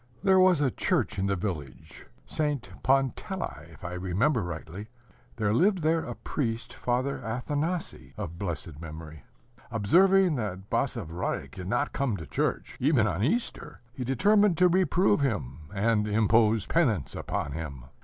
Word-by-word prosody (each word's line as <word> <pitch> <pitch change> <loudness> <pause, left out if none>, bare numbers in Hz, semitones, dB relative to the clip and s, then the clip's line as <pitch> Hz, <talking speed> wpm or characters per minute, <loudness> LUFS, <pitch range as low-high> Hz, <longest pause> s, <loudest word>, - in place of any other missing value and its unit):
There 190 -1 +5
was 185 -4 +5
a 135 -3 +2
church 150 - 0
in 95 - +1
the 100 - +1
village, 85 -12 -6 0.2
St. 145 -9 -2
Pantelei, 135 - -1
if 85 - -13
I 85 - -4
remember 95 - +1
rightly. 85 +3 -6 0.5
There 105 -2 0
lived 185 - +3
there 160 +1 +2
a - - -5
priest, 115 -4 -3
Father 130 +3 -1
Athanasii 130 - -3
of 85 +1 -6
blessed 85 -5 -5
memory. 80 -2 -9 0.4
Observing 175 - +4
that 100 -4 -5
Basavriuk 80 -4 -2
did 90 +6 -7
not 120 +8 0
come 135 -7 0
to 80 - -7
church, - - -2
even 130 -4 +3
on 95 -1 -1
Easter, 230 - -2
he 125 - -5
determined 200 - +3
to 180 - +6
reprove 180 -2 +3
him, 80 - -2
and 105 +1 +1
impose 110 0 +3
penance 120 - +1
upon 75 - -3
him. 70 -5 -6
115 Hz, 145 wpm, -28 LUFS, -, 0.5 s, to